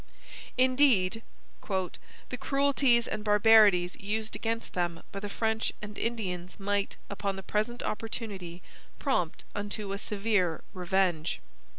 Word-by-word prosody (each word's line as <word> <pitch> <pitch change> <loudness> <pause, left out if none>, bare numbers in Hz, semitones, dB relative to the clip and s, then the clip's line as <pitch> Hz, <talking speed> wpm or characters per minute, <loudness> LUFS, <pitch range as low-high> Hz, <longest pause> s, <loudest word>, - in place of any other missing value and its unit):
Indeed, 255 -6 +4 0.4
'the 190 +5 -5
cruelties 275 -4 +3
and 210 - -3
barbarities 210 -4 +6
used 215 +2 -2
against 225 0 -2
them 175 -2 -1
by 195 - -4
the 205 +1 -5
French 220 +1 0
and 210 0 -8
Indians 190 -6 -3
might, 200 0 -1
upon 200 -1 -2
the 195 - -7
present 215 +5 -1
opportunity, 200 -6 -5 0.3
prompt 220 - -1
unto 205 0 -3
a 200 - -3
severe 200 -6 0
revenge.' 180 -3 +1
205 Hz, 115 wpm, -29 LUFS, 185-225 Hz, 0.4 s, barbarities